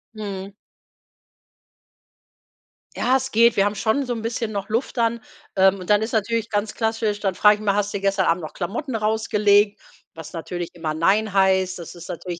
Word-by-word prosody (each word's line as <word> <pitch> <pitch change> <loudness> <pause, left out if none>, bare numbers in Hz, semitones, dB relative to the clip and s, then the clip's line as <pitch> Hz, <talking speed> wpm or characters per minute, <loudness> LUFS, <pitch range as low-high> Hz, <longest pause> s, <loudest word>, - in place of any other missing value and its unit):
Mhm. 200 -2 -6 2.4
Ja, 260 +1 +2
es 265 0 -5
geht. 230 +1 +5
Wir 195 - +3
haben 205 - 0
schon 230 +7 0
so 245 - -2
'n 225 - -5
bisschen 230 -1 -3
noch 200 -1 -4
Luft 235 +3 -2
dann, 230 0 +1 0.4
ähm, 190 0 +4
und 180 - -9
dann 210 +1 +4
ist 220 - -4
natürlich 225 +1 -1
ganz 205 +1 -1
klassisch 220 -2 -1
dann 195 -2 -1
frage 210 +3 +5
ich 210 - -11
mal: 200 -2 +1
„Hast 205 0 0
du 200 - -3
gestern 195 -1 +1
Abend 170 0 +1
noch 155 - -7
Klamotten 230 - -4
rausgelegt?“ 210 -1 +2 0.3
Was 160 -2 -10
natürlich 175 +1 -5
immer 160 -2 -3
nein 200 +6 +1
heißt. 190 -2 +2
Das 170 +1 -9
ist 175 0 -10
natürlich 175 0 -6
205 Hz, 190 wpm, -22 LUFS, 190-220 Hz, 2.4 s, geht